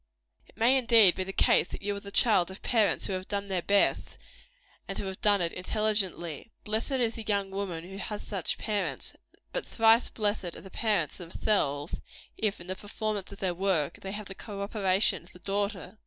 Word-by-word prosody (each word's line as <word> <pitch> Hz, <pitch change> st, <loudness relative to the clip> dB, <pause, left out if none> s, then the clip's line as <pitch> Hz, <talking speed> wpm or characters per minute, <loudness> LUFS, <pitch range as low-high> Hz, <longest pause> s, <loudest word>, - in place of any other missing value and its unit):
It -, -, -23 dB
may, 240 Hz, +4 st, +5 dB
indeed, 230 Hz, -7 st, +6 dB
be 190 Hz, -, -2 dB
the 190 Hz, -, -5 dB
case, -, -, +3 dB
that -, -, -8 dB
you 205 Hz, 0 st, -1 dB
are -, -, -5 dB
the 200 Hz, -, -10 dB
child 200 Hz, -4 st, +3 dB
of 190 Hz, -, -10 dB
parents 220 Hz, -4 st, +2 dB
who -, -, -2 dB
have 185 Hz, 0 st, -4 dB
done 200 Hz, -1 st, -3 dB
their 185 Hz, -2 st, 0 dB
best, 200 Hz, +3 st, +2 dB, 0.7 s
and -, -, -4 dB
who -, -, -3 dB
have 190 Hz, -1 st, -6 dB
done 205 Hz, -2 st, +5 dB
it 170 Hz, -1 st, +1 dB
intelligently. 190 Hz, -4 st, -1 dB
Blessed 220 Hz, +6 st, -1 dB
is 240 Hz, -3 st, +2 dB
the 225 Hz, -, -7 dB
young 200 Hz, -2 st, 0 dB
woman 190 Hz, -4 st, -3 dB
who 190 Hz, +2 st, -9 dB
has 210 Hz, +1 st, -4 dB
such 195 Hz, -5 st, -2 dB
parents, 210 Hz, -2 st, -1 dB, 0.4 s
but -, -, -1 dB
thrice 225 Hz, +1 st, +4 dB
blessed 205 Hz, -5 st, -1 dB
are -, -, -9 dB
the 190 Hz, -, -12 dB
parents 205 Hz, -, 0 dB
themselves, 165 Hz, -4 st, -1 dB, 0.3 s
if, 215 Hz, -2 st, -1 dB
in 175 Hz, -, -10 dB
the 185 Hz, +1 st, -4 dB
performance 205 Hz, 0 st, -4 dB
of 200 Hz, -, -9 dB
their 185 Hz, -2 st, -1 dB
work, 175 Hz, -5 st, 0 dB
they 195 Hz, -, -5 dB
have 210 Hz, 0 st, -5 dB
the 195 Hz, -, -8 dB
co 200 Hz, 0 st, -6 dB
operation 200 Hz, -2 st, +2 dB
of 175 Hz, -, -19 dB
the -, -, -13 dB
daughter. 200 Hz, +1 st, -3 dB
200 Hz, 205 wpm, -29 LUFS, 185-215 Hz, 0.7 s, indeed